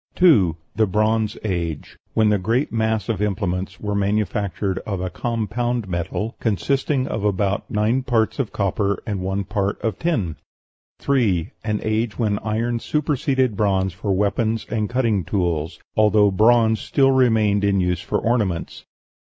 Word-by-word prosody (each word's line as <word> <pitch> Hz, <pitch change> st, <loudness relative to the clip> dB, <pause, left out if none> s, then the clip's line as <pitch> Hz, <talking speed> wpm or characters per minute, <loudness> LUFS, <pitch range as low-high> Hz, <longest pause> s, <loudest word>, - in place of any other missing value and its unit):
2. 100 Hz, -, +4 dB, 0.2 s
The 110 Hz, 0 st, +3 dB
Bronze 110 Hz, +2 st, +1 dB
Age, 85 Hz, -7 st, -3 dB, 0.2 s
when 110 Hz, -1 st, +4 dB
the 105 Hz, -1 st, +2 dB
great 115 Hz, +9 st, 0 dB
mass 110 Hz, -2 st, 0 dB
of 110 Hz, -4 st, -2 dB
implements 95 Hz, -2 st, -2 dB
were 105 Hz, -1 st, -3 dB
manufactured 100 Hz, -2 st, -1 dB
of 100 Hz, -4 st, -4 dB
a 90 Hz, 0 st, -3 dB
compound 120 Hz, +1 st, -2 dB
metal, 90 Hz, +5 st, -3 dB
consisting 130 Hz, -, 0 dB
of 105 Hz, -, -3 dB
about 100 Hz, -1 st, 0 dB
nine 110 Hz, +5 st, +1 dB
parts 120 Hz, -3 st, 0 dB
of 130 Hz, -6 st, -1 dB
copper 100 Hz, 0 st, -1 dB
and 100 Hz, -3 st, -3 dB
one 95 Hz, +2 st, -1 dB
part 100 Hz, 0 st, -2 dB
of 110 Hz, -4 st, -2 dB
tin. 105 Hz, -, -1 dB, 0.6 s
3. 105 Hz, -11 st, +1 dB
An 105 Hz, -2 st, -1 dB
age 110 Hz, 0 st, -1 dB
when 105 Hz, -4 st, 0 dB
iron 115 Hz, +2 st, -1 dB
superseded 130 Hz, -4 st, 0 dB
bronze 95 Hz, -3 st, +1 dB
for 95 Hz, +3 st, -3 dB
weapons 105 Hz, +3 st, 0 dB
and 110 Hz, -2 st, -1 dB
cutting 115 Hz, -6 st, +1 dB
tools, 85 Hz, -4 st, -1 dB, 0.2 s
although 105 Hz, -1 st, +4 dB
bronze 110 Hz, +2 st, +4 dB
still 135 Hz, -2 st, +2 dB
remained 110 Hz, -6 st, +3 dB
in 100 Hz, -1 st, +2 dB
use 90 Hz, -1 st, 0 dB
for 105 Hz, -, -1 dB
ornaments. 105 Hz, -8 st, -1 dB
105 Hz, 150 wpm, -22 LUFS, 95-115 Hz, 0.6 s, 2